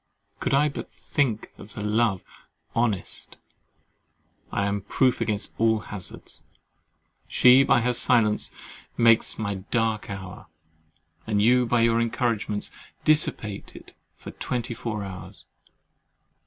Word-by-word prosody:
Could -, -, +1 dB
I 145 Hz, +2 st, +4 dB
but 140 Hz, -, -6 dB
think 120 Hz, -7 st, -2 dB
the 105 Hz, 0 st, -8 dB
love 105 Hz, -2 st, +1 dB, 0.5 s
"honest," 115 Hz, -5 st, -2 dB, 1.1 s
I 100 Hz, -, 0 dB
am 100 Hz, 0 st, -1 dB
proof 125 Hz, +6 st, +1 dB
against 105 Hz, -2 st, -1 dB
all 110 Hz, 0 st, +4 dB
hazards. 105 Hz, -3 st, -6 dB, 0.8 s
She 125 Hz, +1 st, +6 dB
by 135 Hz, -2 st, +4 dB
her 125 Hz, +1 st, +1 dB
silence 115 Hz, -3 st, +3 dB, 0.5 s
makes 115 Hz, -1 st, +4 dB
my 100 Hz, -3 st, -2 dB
dark 115 Hz, -2 st, 0 dB
hour; 95 Hz, -2 st, -8 dB, 0.8 s
and 105 Hz, -2 st, +1 dB
you 125 Hz, +3 st, +4 dB
by 120 Hz, 0 st, +2 dB
your 115 Hz, 0 st, +3 dB
encouragements 115 Hz, -3 st, -1 dB, 0.3 s
dissipate 130 Hz, -9 st, +1 dB
it -, -, -13 dB, 0.2 s
for -, -, -10 dB
twenty 120 Hz, -1 st, -3 dB
four 110 Hz, -2 st, -4 dB
hours. 95 Hz, -2 st, -7 dB
115 Hz, 115 wpm, -25 LUFS, 105-120 Hz, 1.1 s, She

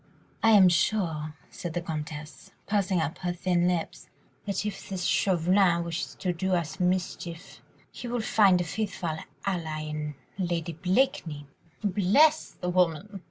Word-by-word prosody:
"I 225 Hz, -, +5 dB
am 195 Hz, -3 st, +8 dB
sure," 165 Hz, -4 st, +1 dB, 0.2 s
said 170 Hz, -2 st, -6 dB
the 175 Hz, -, 0 dB
Comtesse, 155 Hz, +2 st, -6 dB, 0.2 s
pursing 195 Hz, -3 st, +1 dB
up 160 Hz, -1 st, -2 dB
her 180 Hz, -1 st, -1 dB
thin 175 Hz, 0 st, +1 dB
lips, 175 Hz, -2 st, -2 dB, 0.4 s
"that 200 Hz, +1 st, -1 dB
if 205 Hz, -2 st, -5 dB
this 190 Hz, -2 st, -3 dB
Chauvelin 180 Hz, -1 st, +3 dB
wishes 170 Hz, +2 st, -4 dB
to 180 Hz, -2 st, -1 dB
do 185 Hz, +2 st, 0 dB
us 170 Hz, +1 st, -3 dB
mischief, 180 Hz, -2 st, -2 dB, 0.3 s
he 245 Hz, -, -7 dB
will 240 Hz, 0 st, -1 dB
find 200 Hz, -4 st, +4 dB
a -, -, +1 dB
faithful 170 Hz, -3 st, -3 dB, 0.3 s
ally 165 Hz, -5 st, -2 dB
in 150 Hz, -1 st, -4 dB, 0.2 s
Lady 170 Hz, -2 st, -1 dB
Blakeney." 175 Hz, -, 0 dB, 0.4 s
"Bless 210 Hz, -, +4 dB
the 180 Hz, -, -5 dB
woman!" 180 Hz, +3 st, +1 dB
180 Hz, 145 wpm, -28 LUFS, 165-195 Hz, 0.4 s, am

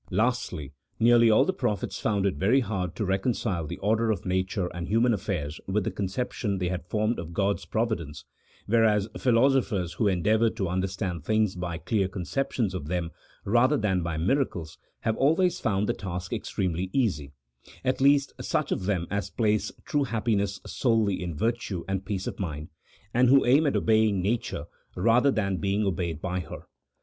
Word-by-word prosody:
Lastly, 100 Hz, -, -1 dB, 0.3 s
nearly 115 Hz, 0 st, +6 dB
all 110 Hz, -, +5 dB
the 190 Hz, -, 0 dB
prophets 115 Hz, -, -2 dB
found 100 Hz, -3 st, 0 dB
it 100 Hz, -, +2 dB
very 115 Hz, +8 st, +3 dB
hard 95 Hz, -6 st, -3 dB
to 105 Hz, -, -2 dB
re 95 Hz, +1 st, +1 dB
concile 95 Hz, -7 st, -1 dB
the 85 Hz, -, -5 dB
order 110 Hz, +3 st, +1 dB
of 105 Hz, -3 st, -1 dB
nature 95 Hz, +1 st, 0 dB
and 85 Hz, -1 st, -5 dB
human 115 Hz, +3 st, +3 dB
affairs 90 Hz, -7 st, -3 dB
with 100 Hz, +2 st, 0 dB
the -, -, -2 dB
conception 105 Hz, +1 st, -2 dB
they 90 Hz, -1 st, -1 dB
had 90 Hz, -2 st, -4 dB
formed 110 Hz, +3 st, 0 dB
of 85 Hz, 0 st, -7 dB
God's 100 Hz, 0 st, 0 dB
providence, 95 Hz, -, -2 dB, 0.4 s
whereas 110 Hz, -2 st, +3 dB
philosophers 120 Hz, -7 st, +2 dB
who 110 Hz, -, +1 dB
endeavour 110 Hz, +5 st, +3 dB
to 95 Hz, -3 st, -3 dB
understand 95 Hz, -2 st, -2 dB
things 110 Hz, +1 st, +1 dB
by 90 Hz, -2 st, -4 dB
clear 95 Hz, +4 st, 0 dB
conceptions 105 Hz, +3 st, -2 dB
of 75 Hz, -6 st, -5 dB
them, 85 Hz, -1 st, -2 dB, 0.3 s
rather 120 Hz, +7 st, +3 dB
than 95 Hz, -6 st, +1 dB
by 85 Hz, -2 st, -3 dB
miracles, 90 Hz, -, -1 dB, 0.2 s
have 110 Hz, -1 st, 0 dB
always 165 Hz, +6 st, +2 dB
found 105 Hz, -3 st, 0 dB
the -, -, +1 dB
task 90 Hz, -2 st, -5 dB
extremely 90 Hz, 0 st, -2 dB
easy 90 Hz, -, 0 dB, 0.3 s
— -, -, -20 dB
at 130 Hz, +1 st, 0 dB
least, 140 Hz, 0 st, +4 dB
such -, -, -1 dB
of 95 Hz, -, -1 dB
them 95 Hz, -4 st, 0 dB
as 100 Hz, 0 st, -2 dB
place 105 Hz, -2 st, 0 dB
true 145 Hz, -2 st, +1 dB
happiness 105 Hz, -5 st, -1 dB
solely 110 Hz, -6 st, +1 dB
in 90 Hz, -3 st, -4 dB
virtue 110 Hz, -4 st, -1 dB
and 95 Hz, 0 st, -2 dB
peace 100 Hz, -3 st, -2 dB
of -, -, -5 dB
mind, 80 Hz, -5 st, -4 dB, 0.4 s
and 125 Hz, +1 st, +4 dB
who 135 Hz, +1 st, +6 dB
aim 140 Hz, +5 st, +4 dB
at 140 Hz, -, +1 dB
obeying 110 Hz, -3 st, +3 dB
nature, 110 Hz, +6 st, -2 dB, 0.3 s
rather 115 Hz, +8 st, +4 dB
than 100 Hz, -7 st, 0 dB
being 100 Hz, +5 st, 0 dB
obeyed 85 Hz, -4 st, -2 dB
by 90 Hz, +2 st, -2 dB
her. 85 Hz, -, -8 dB
100 Hz, 180 wpm, -27 LUFS, 90-115 Hz, 0.4 s, nearly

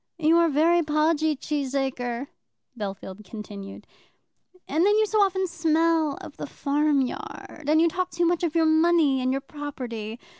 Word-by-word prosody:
"You 320 Hz, 0 st, +3 dB
are 335 Hz, -1 st, +4 dB
very 330 Hz, +4 st, +3 dB
podgy, 310 Hz, 0 st, +1 dB
Cheesacre," 265 Hz, -4 st, -2 dB, 0.5 s
Bellfield 200 Hz, -2 st, -6 dB
continued, 200 Hz, -1 st, -9 dB, 0.8 s
"and 310 Hz, +5 st, +1 dB
then 415 Hz, +2 st, +4 dB
you 435 Hz, -, +4 dB
so 430 Hz, 0 st, +1 dB
often 380 Hz, -1 st, +2 dB
smell 325 Hz, -2 st, +1 dB
of -, -, -11 dB
the -, -, -5 dB
farm 290 Hz, 0 st, +1 dB
yard; 265 Hz, +2 st, -6 dB
and 310 Hz, +1 st, +4 dB
you 335 Hz, -, +5 dB
talk 365 Hz, +2 st, -2 dB
too 345 Hz, -1 st, 0 dB
much 345 Hz, 0 st, +1 dB
of 335 Hz, -1 st, -1 dB
your 325 Hz, -1 st, +4 dB
money 315 Hz, -4 st, +3 dB
and 255 Hz, 0 st, 0 dB
your 270 Hz, +1 st, -1 dB
property. 245 Hz, -7 st, -6 dB
305 Hz, 160 wpm, -25 LUFS, 265-335 Hz, 0.8 s, you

